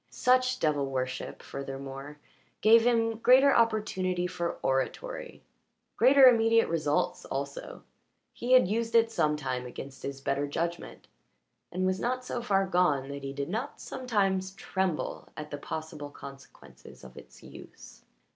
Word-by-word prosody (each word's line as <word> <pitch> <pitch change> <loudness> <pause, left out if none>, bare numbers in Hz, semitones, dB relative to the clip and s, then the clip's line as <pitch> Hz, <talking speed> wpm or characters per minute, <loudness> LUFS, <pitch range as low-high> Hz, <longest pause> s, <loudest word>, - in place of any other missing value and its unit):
Such 255 0 +2
devil 145 -3 +1
worship, 130 -1 -4
furthermore, 135 +1 -7 0.4
gave 225 +2 +7
him 225 -2 +1
greater 265 +4 +6
opportunity 190 -6 +1
for 170 -1 -3
oratory, 135 - -3 0.5
greater 265 +3 +6
immediate 230 -2 +5
results 155 -3 -1
also; 140 +1 -6 0.5
he 245 +2 -1
had 255 -7 +6
used 230 +3 -2
it 230 0 +4
sometimes 150 - -1
against 135 +2 -9
his 140 0 -5
better 140 +1 -1
judgment, 170 +4 -4 0.6
and 185 +1 -1
was 185 0 0
not 250 +3 -2
so 245 - -3
far 195 -4 +1
gone 175 -8 +1
that 140 0 -6
he 135 - -4
did 140 +2 -4
not 230 +9 -4
sometimes 195 -7 -1
tremble 190 -4 -3
at 150 0 -7
the 145 - -5
possible 155 -1 -6
consequences 140 -1 -13
of 65 0 -13
its - - -14
use. - - -14
180 Hz, 135 wpm, -29 LUFS, 140-230 Hz, 0.6 s, gave